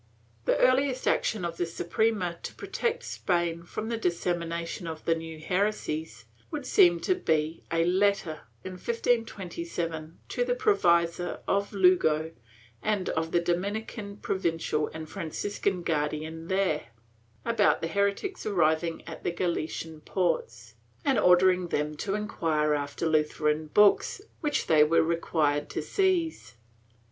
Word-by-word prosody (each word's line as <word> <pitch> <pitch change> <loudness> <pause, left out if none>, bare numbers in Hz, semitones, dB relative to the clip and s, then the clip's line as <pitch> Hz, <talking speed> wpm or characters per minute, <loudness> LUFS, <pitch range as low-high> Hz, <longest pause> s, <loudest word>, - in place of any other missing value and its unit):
The - - +3
earhest 260 +1 +3
action 210 -6 +1
of 170 -1 -4
the 175 - 0
Suprema 175 +1 -1
to - - -7
protect 475 0 -2
Spain 170 -2 -1
from 215 +6 -5
the 230 - -1
dissemination 170 -2 -2
of 160 -1 -7
the 165 - +4
new 165 -1 -6
heresies 160 - -2 0.2
would 295 -4 -5
seem 175 -7 +5
to - - +2
be 160 - 0
a 165 0 +2
letter, 185 -3 +1 0.2
in 185 - -6
1527, 175 -7 -2
to 245 - 0
the 245 0 0
provisor 175 -6 +2
of 200 +1 +1
Lugo 175 -5 +3 0.5
and 205 - 0
to 160 0 0
the 175 - +2
Dominican 200 +4 -3
provincial 165 -6 -1
and 160 0 -7
Franciscan 180 +1 -3
guardian 155 +1 -2
there, 190 -7 0 0.6
about 230 -3 +3
the 165 - -1
heretics 200 - -1
arriving 165 -4 +1
at 165 - -8
the - - 0
Galician 165 -2 -3
ports, 120 - -2 0.3
and 270 -4 +3
ordering 180 0 +5
them 150 -2 -1
to 195 +4 -2
enquire 160 -7 0
after 145 +2 -2
Lutheran 155 0 +1
books, 205 - +4 0.2
which 300 -3 0
they 155 -2 +6
were 160 +2 +4
required 160 -3 0
to - - -3
seize. 355 - 0
170 Hz, 135 wpm, -28 LUFS, 160-200 Hz, 0.6 s, they